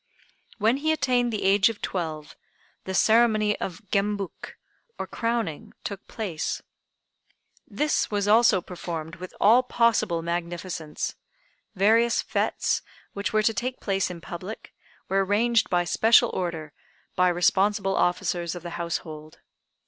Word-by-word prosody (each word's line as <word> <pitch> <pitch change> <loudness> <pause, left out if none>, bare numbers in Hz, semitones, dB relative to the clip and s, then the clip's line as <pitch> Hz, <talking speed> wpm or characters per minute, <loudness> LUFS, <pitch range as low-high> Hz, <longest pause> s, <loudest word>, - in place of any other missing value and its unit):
When 225 +4 +2
he 315 +3 0
attained 250 -5 +1
the 215 - -3
age 195 +2 +4
of 225 - -6
twelve 155 -4 -4 0.5
the 190 - -3
ceremony 215 -1 +4
of 185 +3 -5
Gembuk 200 -2 -2 0.4
(or - - -3
crowning) 230 -9 -3
took 200 -2 -6
place. 190 -9 -3 1.1
This 300 0 0
was 205 -1 -1
also 220 -3 +5
performed 170 -2 -6
with 185 +1 -8
all 230 +5 +6
possible 230 -9 +1
magnificence. 170 -1 -4 0.6
Various 225 +5 +3
fêtes, - - 0 0.3
which 200 0 -3
were 215 0 +2
to 225 - +3
take 250 +5 -3
place 195 -2 0
in 175 -2 -8
public, 185 +6 -8 0.3
were 195 +1 +2
arranged 225 +4 +2
by 175 -1 +2
special 225 +6 +4
order 165 -4 -4 0.4
by 180 - +4
responsible 195 +3 +2
officers 175 -1 0
of 175 - -8
the 175 - -6
Household. 155 -2 -5
195 Hz, 130 wpm, -25 LUFS, 175-225 Hz, 1.1 s, all